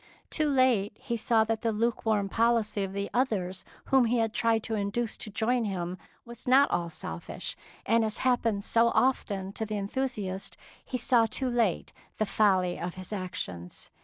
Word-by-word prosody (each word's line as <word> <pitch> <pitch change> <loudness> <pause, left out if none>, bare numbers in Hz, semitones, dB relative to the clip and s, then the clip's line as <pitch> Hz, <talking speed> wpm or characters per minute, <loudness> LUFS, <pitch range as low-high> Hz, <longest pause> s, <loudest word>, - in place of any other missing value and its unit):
Too 305 -2 +1
late 245 -7 +2
he 235 - -3
saw 225 0 +3
that 220 0 -2
the 230 - +1
lukewarm 220 -2 0
policy 225 -1 +1
of 190 - -4
the 200 +1 -3
others 195 -8 0 0.2
whom 265 -2 +4
he 235 +2 +1
had 225 -1 0
tried 225 -2 +1
to 225 - -4
induce 215 +2 -1
to 215 - -7
join 230 +3 0
him 180 -2 -3 0.3
was 235 +1 -11
not 270 +3 +5
all 170 -1 0
selfish, 85 - -6 0.3
and 230 +1 +3
as 220 +1 +1
happens 230 -5 +1
so 230 0 +4
often 200 -7 +1
to 220 - -3
the 215 -1 -3
enthusiast, 200 -3 -3 0.3
he 255 - -3
saw 235 -2 +4
too 255 +4 -1
late 230 -7 0 0.2
the 215 - +1
folly 190 -4 +2
of 175 0 -4
his 185 +2 -7
actions. 95 - -6
220 Hz, 175 wpm, -29 LUFS, 195-235 Hz, 0.3 s, not